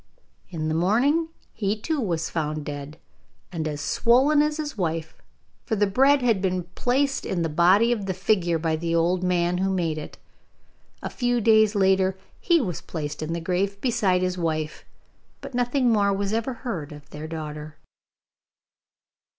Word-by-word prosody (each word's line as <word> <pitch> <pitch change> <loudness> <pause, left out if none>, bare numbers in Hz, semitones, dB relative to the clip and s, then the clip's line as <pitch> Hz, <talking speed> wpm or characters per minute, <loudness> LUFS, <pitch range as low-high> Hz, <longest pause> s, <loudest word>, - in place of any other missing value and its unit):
In 160 -4 -3
the 155 - 0
morning 245 - +2 0.3
he 210 0 -1
too 310 +5 -2
was 170 -7 -1
found 155 -2 -3
dead, 145 +1 -7 0.5
and 160 -3 -3
as 150 -1 -4
swollen 270 +6 +3
as 300 0 0
his 305 -1 -4
wife, 165 -4 -3 0.5
for 220 - -1
the 205 0 +3
bread 270 +7 +3
had 225 -6 +2
been 185 -2 0
placed 275 +3 0
in 175 -3 -2
the 165 - -1
body 185 +9 +4
of 210 -5 -1
the 190 - -2
figure 185 -3 +1
by 160 0 0
the 165 +1 -1
old 175 +2 +2
man 180 0 +1
who 190 +1 +1
made 170 -5 -1
it. 150 - -9 0.9
A - - -3
few 245 -1 0
days 220 -1 +4
later 190 -1 +2 0.2
he 345 -2 +3
was 185 - -3
placed 150 -3 -5
in 155 +1 -3
the 170 - -2
grave 190 +4 -1
beside 200 -7 +1
his 180 0 -1
wife, 155 -2 -2 0.5
but - - -9
nothing 245 +1 +1
more 200 -2 +3
was 200 +1 -1
ever 230 +4 -1
heard 165 - -4
of 145 -1 -12
their 150 +1 -7
daughter. 155 -1 -7
185 Hz, 170 wpm, -24 LUFS, 165-230 Hz, 0.9 s, body